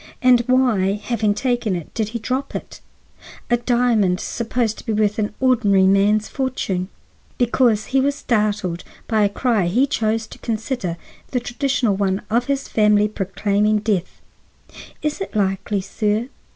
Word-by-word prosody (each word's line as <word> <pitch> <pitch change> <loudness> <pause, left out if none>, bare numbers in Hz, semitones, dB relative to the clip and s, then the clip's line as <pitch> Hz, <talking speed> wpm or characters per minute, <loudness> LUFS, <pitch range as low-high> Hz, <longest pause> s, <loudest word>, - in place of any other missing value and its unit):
And 250 -1 +5
why, 245 -7 +3
having 210 -1 -1
taken 240 -3 0
it, 170 -3 -7
did 220 -2 -1
he 235 - -4
drop 255 +4 -3
it—a 240 - -6
diamond 235 -6 +2
supposed 230 -1 -2
to - - -12
be 225 - 0
worth 210 0 +1
an 210 -1 0
ordinary 220 -7 +3
man's 205 +2 +3
fortune? 205 -9 -2 0.5
Because 240 -3 +2
he 270 +1 +1
was 280 +1 +1
startled 210 -8 -1 0.2
by 220 -2 +2
a 200 - +3
cry 215 -3 +1
he 240 +10 +3
chose 225 -4 -1
to - - -13
consider 225 -5 -3 0.3
the 250 - 0
traditional 245 -3 0
one 195 0 -1
of 235 +2 +2
his 275 0 -2
family 210 -1 +3
proclaiming 205 +1 0
death? 205 -4 -2 0.8
Is 300 +5 -2
it 390 - -5
likely, 195 0 0
sir? 210 +4 -1
215 Hz, 150 wpm, -21 LUFS, 200-245 Hz, 0.8 s, And